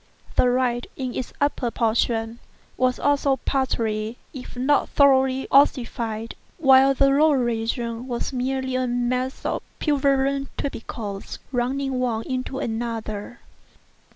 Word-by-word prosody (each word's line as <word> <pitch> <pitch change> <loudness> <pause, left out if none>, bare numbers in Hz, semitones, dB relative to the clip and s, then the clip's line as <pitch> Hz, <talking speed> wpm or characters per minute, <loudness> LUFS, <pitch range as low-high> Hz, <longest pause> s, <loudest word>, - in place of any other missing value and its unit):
The 250 - +4
right, 245 -1 0
in 255 -2 -4
its 255 - -4
upper 285 -4 0
portion, 230 0 0 0.4
was 255 0 +1
also 285 -1 +2
partially, 230 -5 -1 0.2
if 255 -2 -9
not 275 +3 +2
thoroughly, 265 -2 +3
ossified, 230 -5 +2 0.2
while 270 -2 +6
the 275 +1 +4
lower 290 +1 +4
region 235 0 -2
was 245 +2 -3
merely 260 +1 -1
a 255 0 0
mass 250 +2 -1
of - - -1 0.2
purulent 275 -2 +1
tubercles, 215 -6 -5
running 260 +1 -1
one 235 -3 -1
into 255 +1 -3
another. 225 -2 -4
255 Hz, 120 wpm, -23 LUFS, 235-270 Hz, 0.4 s, while